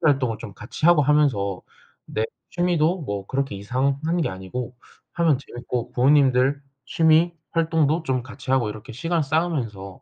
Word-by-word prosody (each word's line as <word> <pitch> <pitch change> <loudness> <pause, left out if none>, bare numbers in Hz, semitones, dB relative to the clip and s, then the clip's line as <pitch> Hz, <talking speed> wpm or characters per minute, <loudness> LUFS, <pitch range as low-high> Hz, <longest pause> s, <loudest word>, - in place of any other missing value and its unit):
활동을 135 -8 +2
좀 105 -4 -8
같이 - - -5
하고 170 -3 +6
하면서 135 -10 +2 0.4
내 110 - -2 0.3
취미도 175 0 +1
뭐 100 -8 -4
그렇게 135 -5 -2
이상한 135 - -1
게 - - 0
아니고 95 +7 -6 0.4
하면 165 -5 +3
재미있고 120 -2 -5
부모님들 135 0 +3 0.2
취미 160 +3 +3 0.2
활동도 160 -1 +1
좀 130 -4 -1
같이 130 +1 -7
하고 130 -5 +2
이렇게 110 +4 -9
시간 165 +6 -1
쌓으면서 135 - -2
135 Hz, 330 characters per minute, -23 LUFS, 120-160 Hz, 0.4 s, 하고